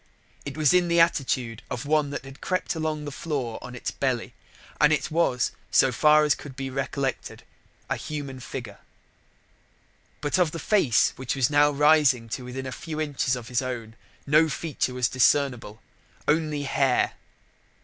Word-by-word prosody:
It 140 +1 -6
was 155 +1 +4
in 180 -1 +4
the 170 0 +2
attitude 130 -8 +1
of 125 +4 -4
one 150 -1 +2
that 140 - -6
had 135 0 -12
crept 185 -1 -1
along 155 -2 -3
the 145 - -5
floor 135 -6 -4
on 125 - -9
its 125 - -4
belly, 130 -4 -2 0.5
and 150 0 +5
it 155 - 0
was, 140 -7 +1 0.2
so 135 - +4
far 150 +5 +5
as 150 -1 +4
could 140 -2 -10
be 135 0 -5 0.2
collected, 135 -2 -3 0.4
a - - -1
human 145 -4 -6
figure. 120 -5 -7 1.4
But 150 +5 0
of 170 -4 +2
the - - -4
face 155 - +2
which 130 0 -3
was 135 0 +1
now 145 0 +5
rising 145 -5 +3
to 125 - -4
within 130 +2 -6
a 130 - -5
few 155 +3 -6
inches 145 -4 0
of 120 -2 -8
his 125 0 +1
own 120 -3 -5 0.3
no 155 +2 +4
feature 145 -4 -2
was 125 -1 +2
discernible, 125 -4 +1 0.4
only 150 -1 +1
hair. 135 -2 +1
140 Hz, 170 wpm, -25 LUFS, 125-155 Hz, 1.4 s, and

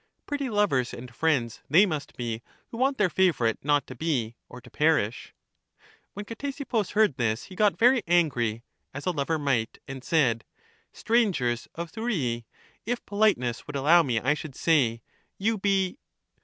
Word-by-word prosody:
Pretty 285 -2 -3
lovers 205 - +1
and 125 0 -10
friends 130 -5 0
they 175 +9 +6
must 155 -7 -5
be 115 -2 -3 0.3
who 230 - -8
want 270 +3 +1
their 210 - +3
favorite 165 -11 +1
not 145 -1 +2
to - - -9
be, 125 -9 -2
or 125 - -10
to - - -16
perish! 150 -8 +1 0.8
When 205 +1 -6
Ctesippus 245 -2 -3
heard 210 -9 +3
this 115 -1 0
he 185 - -12
got 210 +1 +2
very 245 +1 +5
angry 125 -10 +1 0.3
(as 140 - -6
a 180 - +2
lover 160 0 -1
might) 135 -7 -1
and 135 -2 -7
said: 130 -9 +2 0.5
Strangers 185 - 0
of 170 0 -5
Thurii 145 - -2 0.2
— - - -32
if 245 - -3
politeness 200 - +1
would 150 - -7
allow 155 +6 +5
me 125 -8 0
I 135 +6 +2
should 150 -3 -7
say. 120 -8 +2 0.3
You 215 +2 0
be 195 +3 0
155 Hz, 165 wpm, -27 LUFS, 125-205 Hz, 0.8 s, they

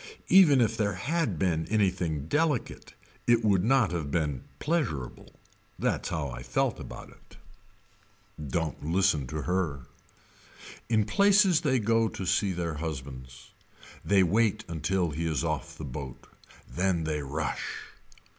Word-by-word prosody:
Even 160 -9 +7
if 115 -1 +2
there 100 -3 0
had 145 - -1
been 80 -2 0
anything 90 -8 0
delicate 150 - -1 0.3
it 120 -1 +4
would 95 -4 +3
not 120 -5 +3
have 80 -5 -3
been 75 -4 -1 0.2
pleasurable. 125 - -3 0.4
That's - - -1
how 75 -3 -2
I - - -7
felt 65 0 -1
about - - -9
it. - - -20 1.1
Don't 80 +2 -2
listen 80 -4 +1
to 75 +3 -4
her. 85 -7 -1 1.1
In 110 -3 +3
places 195 - +4
they 135 -5 +2
go 115 0 +2
to 95 - -6
see 100 +2 +1
their 85 -2 -3
husbands. 65 -4 -7 0.5
They 100 -1 +4
wait 110 +3 +1
until 85 +1 -1
he 80 +3 -2
is 75 -5 -1
off - - -3
the - - -6
boat. 65 -1 -7 0.4
Then 90 -2 0
they 75 -1 -2
rush. 75 +3 -4
90 Hz, 135 wpm, -28 LUFS, 75-110 Hz, 1.1 s, Even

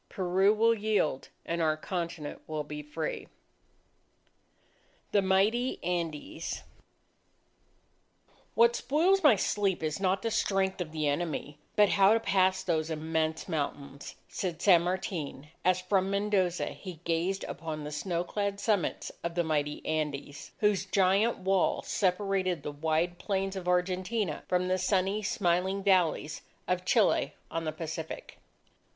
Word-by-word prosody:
Peru 190 +2 +2
will 225 +2 +4
yield, 210 -10 0 0.2
and 170 0 -2
our 155 -1 +2
continent 170 -3 -4
will 155 -1 -3
be 150 0 -6
free! 150 +2 -4 1.8
THE 200 - +4
MIGHTY 205 +7 +2
ANDES 165 -2 -3 1.9
"What 235 +1 +5
spoils 330 +11 +2
my 295 - +7
sleep, 195 -2 0
is 155 +2 -1
not 190 0 +1
the 230 - -1
strength 190 -2 +1
of 160 -3 -4
the 155 -2 -1
enemy, 145 -1 -2 0.2
but 210 -1 +5
how 195 +1 +5
to - - +2
pass 190 -3 +2
those 160 -3 0
immense 160 0 -1
mountains," 140 -4 -4
said 175 -3 -4
San 175 -2 +6
Martin, 170 -5 -3
as 185 0 +3
from 190 +1 +1
Mendoza 200 -3 +1
he 180 -5 -9
gazed 175 +4 0
upon 155 -2 -5
the 150 - -6
snow 170 +3 -2
clad 200 +1 -2
summits 200 -3 0
of 170 0 -3
the 175 - +2
mighty 150 -2 -1
Andes, 150 -2 -3
whose 210 -2 +3
giant 195 +4 +3
wall 190 -1 +1
separated 185 -4 0
the - - -4
wide 160 +4 -1
plains 195 -1 -1
of 185 -2 -5
Argentina 185 +1 0
from 180 0 +1
the 185 0 +1
sunny 190 +2 +1
smiling 190 0 0
valleys 180 -6 +2 0.3
of 180 0 -1
Chile 220 +2 +2 0.2
on 165 0 -2
the 155 - -1
Pacific. 160 0 -6
180 Hz, 135 wpm, -30 LUFS, 160-195 Hz, 1.9 s, my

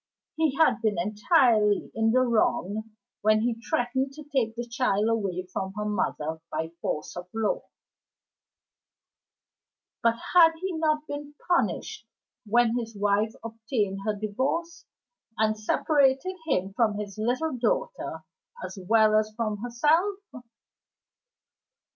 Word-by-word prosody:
He 315 -4 +1
had 265 -7 +3
been 215 -4 +1
entirely 210 - +3
in 225 0 +2
the 255 +2 +4
wrong 220 -3 0 0.3
when 215 +1 +4
he 230 0 -1
threatened 260 +3 -1
to 305 +2 -10
take 260 -6 -1
the 240 0 -4
child 235 -4 +1
away 200 -5 -1
from 190 0 -3
her 210 - -2
mother 160 -6 -2
by 160 +1 -2
force 150 - -3
of 175 0 -7
law; 225 -2 0 2.4
but 230 0 +3 0.2
had 330 -2 +7
he 380 +2 -3
not 310 -1 0
been 290 -1 -7
punished 230 - 0 0.4
when 235 +1 +3
his 225 -2 -6
wife 205 +2 +1
obtained 220 -3 -2
her 215 0 -1
Divorce, 265 +12 -3 0.5
and 215 0 +2
separated 275 +9 +2
him 195 - 0
from 215 -2 +1
his 210 -1 -6
little 255 +7 0
daughter 480 - -2 0.4
as 200 - -8
well 215 +2 +4
as 215 0 +2
from 215 -2 -2
herself? 300 - +2
225 Hz, 125 wpm, -27 LUFS, 210-270 Hz, 2.4 s, had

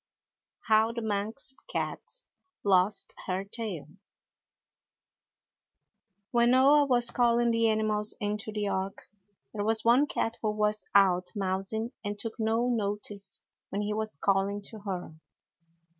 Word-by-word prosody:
HOW 220 +1 +3
THE 235 -1 -4
MANX 220 +6 -2 0.2
CAT - - -4 0.4
LOST 195 0 +2
HER 185 +1 -1
TAIL 200 -6 -6 2.4
When 235 0 +4
Noah 275 +4 +6
was 240 -2 +3
calling 240 -1 +3
the 230 0 +3
animals 215 -1 0
into 210 +1 -2
the 210 -1 -2
Ark, 195 0 -3 0.5
there 205 -2 -2
was 220 +1 +1
one 250 +5 +5
cat 225 -4 -2
who 215 - 0
was 210 0 0
out 180 -2 +4
mousing 195 +4 -2
and 205 0 -3
took 225 +2 -5
no 225 +2 +1
notice 205 -3 -2 0.3
when 205 +1 -2
he 210 0 -1
was 220 -5 -3
calling 195 +5 0
to 220 - -9
her. 185 -5 -5
215 Hz, 130 wpm, -29 LUFS, 200-230 Hz, 2.4 s, Noah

